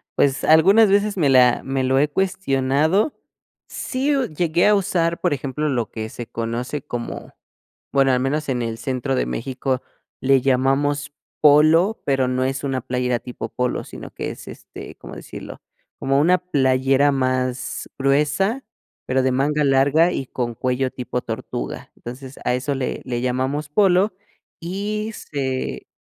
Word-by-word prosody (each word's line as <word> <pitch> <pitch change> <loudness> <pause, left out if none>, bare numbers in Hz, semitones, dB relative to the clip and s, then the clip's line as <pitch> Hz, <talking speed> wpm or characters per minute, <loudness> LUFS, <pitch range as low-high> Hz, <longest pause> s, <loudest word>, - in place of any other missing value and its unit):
Pues 140 -1 +2
algunas 195 +8 +6
veces 200 0 +2
me 145 -5 +3
la 125 -2 +5
me 135 -1 -1
lo 130 +1 +2
he 150 - +3
cuestionado. 160 - +1 0.5
Sí, 275 +3 -1
uh, 270 -2 +1
llegué 170 +3 +1
a 210 - +5
usar, 170 -3 0
por - - +1
ejemplo, 140 +3 -3
lo 120 -5 -1
que 110 -1 -5
se 120 - -8
conoce 120 +5 -4
como, 120 -1 -6 0.6
bueno, 135 -1 +3
al 125 - +2
menos 145 +3 -1
en 125 -2 0
el 115 -1 -3
centro 130 +2 -2
de - - 0
México 130 +1 -2 0.4
le 135 -1 +4
llamamos 140 +2 +1 0.3
polo, 155 +7 +5
pero 135 -2 +1
no 130 0 0
es 135 +1 -2
una 135 -2 -1
playera 125 -1 -1
tipo 120 -2 -7
polo, 125 +1 -2
sino - - -10
que - - -4
es, - - -11
este, - - -10
¿cómo - - -11
decirlo?, - - -9 0.4
como 135 +1 +1
una 180 +4 +4
playera 135 -4 +2
más 130 -1 -2
gruesa, 150 - +1 0.4
pero 130 0 +1
de 130 - +2
manga 150 +3 +1
larga 140 +5 +4
y 135 - -3
con 120 -2 -3
cuello 130 +1 -1
tipo 125 -1 -4
tortuga, 65 - -6
entonces, 130 +2 -9
a 125 - +2
eso 140 +2 -2
le 130 -1 -3
le 120 -1 -2
llamamos 130 +4 -1
polo 195 +3 +3 0.5
y 205 +5 -3
se 130 - -4
135 Hz, 155 wpm, -21 LUFS, 130-155 Hz, 0.6 s, algunas